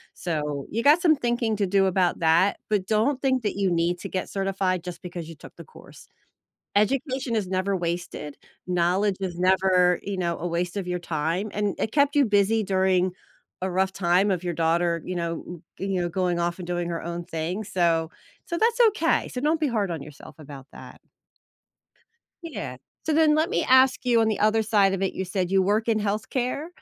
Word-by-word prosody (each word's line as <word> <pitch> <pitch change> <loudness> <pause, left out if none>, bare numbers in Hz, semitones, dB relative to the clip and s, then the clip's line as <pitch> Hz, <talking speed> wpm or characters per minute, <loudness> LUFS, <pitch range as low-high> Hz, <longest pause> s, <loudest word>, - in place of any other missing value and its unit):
So, 150 -4 -3
you 230 - -1
got 300 +4 +6
some 320 -3 +5
thinking 240 -4 -1
to 200 -2 0
do 195 0 +3
about 185 -1 +1
that, 170 +4 +3
but 200 -3 0
don't 230 +6 +1
think 260 -3 +1
that 205 - -1
you 195 -2 +1
need 170 +1 0
to - - -7
get 185 - -3
certified 195 -2 -1
just 180 -2 -7
because 175 -2 -7
you 165 - -9
took - - -14
the - - -9
course. 475 - -16 0.7
Education 260 +3 0
is 195 -4 -1
never 190 +1 0
wasted. 170 -4 -4 0.3
Knowledge 180 +3 +1
is 180 -2 -4
never, 185 -1 +3
you 195 -2 -4
know, 170 -2 -1
a 175 - -4
waste 175 +2 -2
of 190 -3 -3
your 180 0 -2
time, 170 +5 -2
and 205 -1 -1
it 220 - -2
kept 285 -1 +3
you 280 -3 +5
busy 210 +2 +2
during 185 -1 +1 0.5
a 185 - -1
rough 190 +1 0
time 190 +2 +2
of 180 -1 -1
your 175 - -1
daughter, 170 +1 +1
you 185 - -4
know, 170 0 -5 0.2
g 195 - -3
you 185 -2 -1
now, 175 - -1
going 180 -1 -1
off, 170 +1 -1
and 175 - -7
doing 175 -1 -2
her 165 - -4
own 170 +1 -5
thing, 170 +5 -4
so 170 -4 +1 0.4
so, 340 -1 -3
that's 465 +2 +1
okay, 335 -6 0
so 250 - -5
don't 310 +3 +1
be 305 - +2
hard 210 -6 -1
on 160 -4 -4
yourself 150 0 -13
about 140 -3 -11
that. - - -12 1.4
Yeah. 130 - -6 0.3
So, 315 - +1
then 310 -1 +4
let 315 +3 +1
me 460 - 0
ask 260 0 +4
you, 235 -2 +4
on 220 - +2
the 215 - -1
other 215 +1 +3
side 205 -3 +3
of 195 - -3
it, 190 - 0
you 190 - -3
said 185 -1 -2
you 195 0 +3
work 210 +4 +1
in 220 -1 +2
healthcare? 240 +8 -2
190 Hz, 210 wpm, -25 LUFS, 175-220 Hz, 1.4 s, got